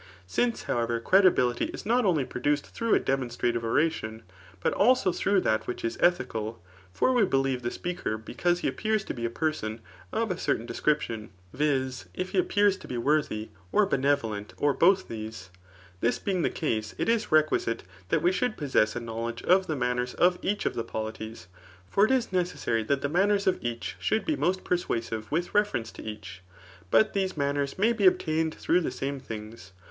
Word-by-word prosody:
Since, 235 - 0
however, 115 -1 0
credibility 130 -6 +4
is - - -7
not 240 +2 +2
only 160 -8 +2
produced 145 +4 -1
through 230 -1 +2
a - - +4
demonstrative 120 -3 -1
oration, 115 -3 0 0.4
but - - 0
also 245 -3 +4
through 195 +2 +2
that 110 -7 0
which 120 - -4
is 115 - -1
ethical; 115 - +1 0.3
(for 175 - +2
we 245 - +3
befieve 135 -8 +1
th^ 120 0 -2
speaker 175 -11 -3
because 175 +10 -1
he - - 0
appears 215 -2 0
to - - -5
be 120 -2 -4
a - - 0
person 120 -5 -2 0.3
of 225 -2 0
a 180 - -3
certain 115 - 0
description, 115 -3 -1 0.2
viz. 130 -2 0
if 185 0 -3
he - - +2
appears 205 - +3
to - - -12
be 125 - -4
worthy, 120 -5 0 0.2
or 210 - +4
benevolent, 135 - 0
or 145 -1 +2
both 190 +5 +4
these) 110 -4 -7 0.2
— 90 0 -24
this 120 - +2
being 190 -3 -1
the - - +2
case, 110 -8 -2
it - - -1
is 230 -4 +1
requisite 155 -6 +2 0.3
that - - +1
we 175 - +4
should 240 +4 -1
po^^ess 130 -7 +1
a - - -1
knowledge 115 0 -5
of 185 +1 +4
the 155 - -1
manners 125 -1 -1
of 180 0 +3
each 205 +1 -1
of - - +1
the 115 - -2
polities; 110 -2 -6 0.4
For 200 - +4
it 220 - 0
is 255 -5 +1
necessary 170 -10 0
that 140 +3 +1
the 140 - 0
manners 200 +6 +2
of 190 - +2
each 120 -1 -4
should 220 - 0
be 315 - +1
most 185 -4 0
persuasive 115 -10 -2
with 170 +4 -1
referenee 205 - +1
to - - -9
each. 105 -4 -8 0.5
But 215 - +4
these 190 -4 -1
maa 140 -1 +1
ners 140 -1 -2
may 220 +5 +3
be 205 -4 +4
obtained 160 -2 +1
through 180 +2 +2
the - - -1
same 140 0 -4
things. 110 -5 -9
140 Hz, 195 wpm, -28 LUFS, 115-185 Hz, 0.5 s, credibility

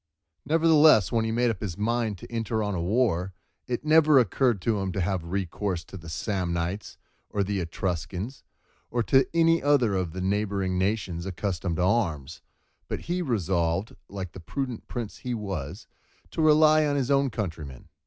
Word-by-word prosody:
Nevertheless 155 - +5
when 115 -1 +1
he 110 - -1
made 120 +1 +2
up 105 - -7
his 95 -5 -4
mind 110 -1 0
to - - -12
enter 115 -1 -1
on 105 -1 -2
a 90 - -2
war, 95 -2 +1 0.3
it 125 +3 -3
never 155 -1 +6
occurred 120 -1 +2
to 110 -3 +1
him 95 -1 -2
to 95 - -2
have 90 -1 -1
recourse 90 0 -3
to - - -13
the 85 -3 -9
Samnites, 90 +1 -3 0.3
or 100 - 0
the 100 0 -2
Etruscans, 90 - -4 0.5
or 120 -1 0
to 135 +4 +4
any 165 0 +3
other 140 -7 +3
of 90 -4 -2
the 95 - -4
neighbouring 95 -1 0
nations 95 -3 -1
accustomed 90 -2 -2
to 90 - 0
arms, 80 - 0 0.5
but - - -4
he 175 +2 -2
resolved, 95 - -1
like 95 -3 -6
the - - -10
prudent 125 - -5
prince 115 -4 -5
he 125 -1 -4
was, 95 -10 -5 0.5
to - - -2
rely 155 0 +6
on 145 -1 +1
his 135 -1 0
own 140 0 +3
countrymen. 80 - -6
105 Hz, 175 wpm, -26 LUFS, 90-125 Hz, 0.5 s, never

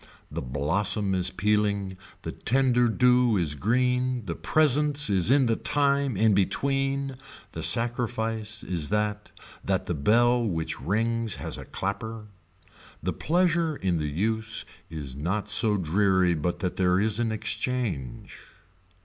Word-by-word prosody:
The - - -4
blossom 85 - 0
is 90 -1 0
pealing, 100 -2 0 0.3
the - - -4
tender 125 -1 +2
dew 125 -1 +3
is 80 -5 0
green, 125 - 0
the 85 - -3
presence 150 -2 +3
is 95 0 +4
in 135 0 +4
the 115 -1 +1
time 140 -4 +1
in 110 +1 +3
between, 135 +7 0 0.4
the 80 - -6
sacrifice 110 +2 -1
is 85 -5 -3
that 105 0 -1 0.3
that - - -1
the - - -2
bell 120 +10 +3
which 80 -6 -3
rings 115 +2 -1
has - - -5
a - - -9
clapper. 105 +3 -5 0.8
The - - -1
pleasure 170 -1 +1
in 90 - -1
the 75 -1 -2
use 110 +7 -2 0.2
is 75 -5 -7
not 95 +8 -3
so 105 0 +2
dreary 95 +1 +2
but 85 +2 -3
that 90 - -3
there 90 -1 +2
is 110 +1 0
an 115 -1 0
exchange. 110 - -3
105 Hz, 140 wpm, -26 LUFS, 95-125 Hz, 0.8 s, is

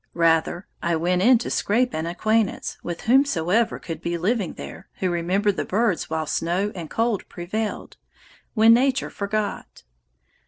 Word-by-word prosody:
Rather 165 +2 +2 0.2
I 170 0 +1
went 180 +3 +1
in 245 +5 +6
to 230 - -5
scrape 245 +5 +1
an 160 +1 -2
acquaintance 215 +4 0
with 175 -1 -5
whomsoever 230 - +2
could 165 -2 -7
be 170 0 -2
living 200 +2 -1
there - - -10
who 185 -2 -1
remembered 185 +4 0
the - - 0
birds 210 -2 0
while 160 0 -1
snow 175 +7 -1
and 170 -4 -7
cold 225 -3 -1
prevailed, 210 +5 -4 0.6
when 225 +1 +7
Nature 260 +2 +2
forgot. 205 +1 -4
195 Hz, 150 wpm, -23 LUFS, 170-225 Hz, 0.6 s, when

